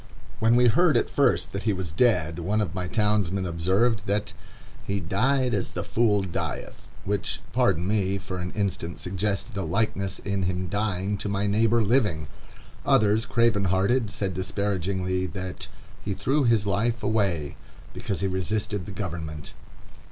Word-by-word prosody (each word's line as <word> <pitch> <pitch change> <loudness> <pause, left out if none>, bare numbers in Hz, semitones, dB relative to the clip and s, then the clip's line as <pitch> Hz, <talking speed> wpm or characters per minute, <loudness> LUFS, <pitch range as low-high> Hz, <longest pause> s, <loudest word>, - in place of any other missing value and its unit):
When 115 +1 +4
we 125 0 +5
heard 155 +7 +4
at - - 0
first 140 - +2
that 100 - -4
he 110 -1 +1
was 95 -4 -4
dead, 85 -5 +2
one 100 +6 0
of 100 -7 -1
my 90 0 -3
townsmen 100 -2 +1
observed 100 +6 +1
that 105 +1 -1 0.5
"he 100 0 -2
died 125 +9 +1
as 100 -3 -1
the - - -3
fool 105 -4 +2
dieth"; 90 -2 -5 0.2
which, 100 -2 -2
pardon 95 -9 +2
me, 100 -2 +1
for 95 -1 -5
an 90 0 -3
instant 95 -5 -2
suggested 100 +4 -2
a - - 0
likeness 100 -2 -1
in 100 -1 -2
him 90 -1 -1
dying 100 0 -1
to 105 - -3
my 100 0 0
neighbor 110 +3 +3
living. 105 - +2 0.6
Others, 110 +2 +3
craven 115 -2 +2
hearted, 100 +6 +2
said 100 -1 -3
disparagingly, 95 -1 -1
that 90 +1 -6 0.4
"he 100 -2 -2
threw 140 +5 +1
his 115 -3 +3
life 110 +4 0
away," 85 -10 0 0.4
because 100 -2 -3
he 95 - +1
resisted 100 +1 -2
the - - -6
government. 80 -6 -5
100 Hz, 160 wpm, -26 LUFS, 95-110 Hz, 0.6 s, we